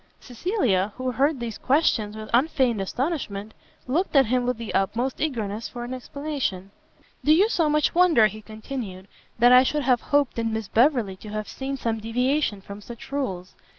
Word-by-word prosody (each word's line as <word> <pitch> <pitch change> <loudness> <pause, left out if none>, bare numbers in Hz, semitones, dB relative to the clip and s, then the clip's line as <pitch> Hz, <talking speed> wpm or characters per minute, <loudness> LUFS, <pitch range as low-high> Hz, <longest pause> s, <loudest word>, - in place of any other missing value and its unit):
Cecilia, 235 - -1
who 255 0 -2
heard 275 +3 +1
these 230 -3 -5
questions 230 -7 +1
with 215 0 -7
unfeigned 250 -4 +2
astonishment, 220 - -3 0.3
looked 310 +7 -1
at 270 -1 +6
him 245 +2 0
with 250 -2 0
the 230 -1 -6
utmost 235 +7 -1
eagerness 225 -7 -2
for 240 -1 -7
an 245 +1 -5
explanation. 255 -8 -4 0.5
"Do 295 - +4
you 365 +7 +5
so 335 -9 +1
much 300 0 +2
wonder," 335 -10 +5
he 215 +1 -2
continued, 215 -3 -7 0.3
"that 240 +1 +6
I 250 0 +9
should 295 +3 0
have 250 -2 +2
hoped 285 -4 +1
in 225 -1 -1
Miss 220 -2 -3
Beverley 230 -5 +2
to 210 - -11
have 215 0 -4
seen 275 +1 -5
some 225 -3 -2
deviation 245 0 0
from 200 +1 -10
such 235 +4 -11
rules? 190 -11 -3
245 Hz, 180 wpm, -24 LUFS, 215-275 Hz, 0.5 s, I